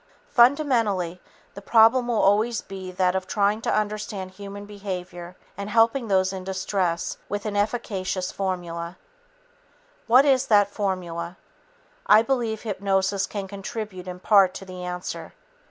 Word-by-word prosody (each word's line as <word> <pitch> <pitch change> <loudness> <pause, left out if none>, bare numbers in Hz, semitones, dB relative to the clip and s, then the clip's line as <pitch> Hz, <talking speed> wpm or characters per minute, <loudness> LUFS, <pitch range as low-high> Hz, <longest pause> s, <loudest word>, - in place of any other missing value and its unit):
Fundamentally, 235 - +3 0.3
the 200 - -9
problem 230 +4 +5
will 235 -2 +1
always 215 +4 +3
be 190 -1 -8
that 180 0 +1
of 190 0 -2
trying 205 +1 +1
to - - -1
understand 210 -2 -2
human 200 +1 -9
behavior 180 -3 -7 0.2
and 200 +1 -5
helping 230 +3 +3
those 190 -1 +2
in 190 -1 -6
distress 185 -2 -2
with 205 +1 -3
an 210 -1 -3
efficacious 200 -3 -1
formula. 175 -2 -4 1.1
What 255 +4 +6
is 270 -2 +3
that 205 -2 +4
formula? 180 -4 -3 0.7
I 215 +1 +7
believe 230 -4 -1
hypnosis 195 -2 0
can 200 -2 -5
contribute 195 -1 -6
in 180 0 -6
part 195 -1 +4
to 195 - -7
the 185 -1 -8
answer. 180 0 -5
200 Hz, 140 wpm, -24 LUFS, 185-220 Hz, 1.1 s, I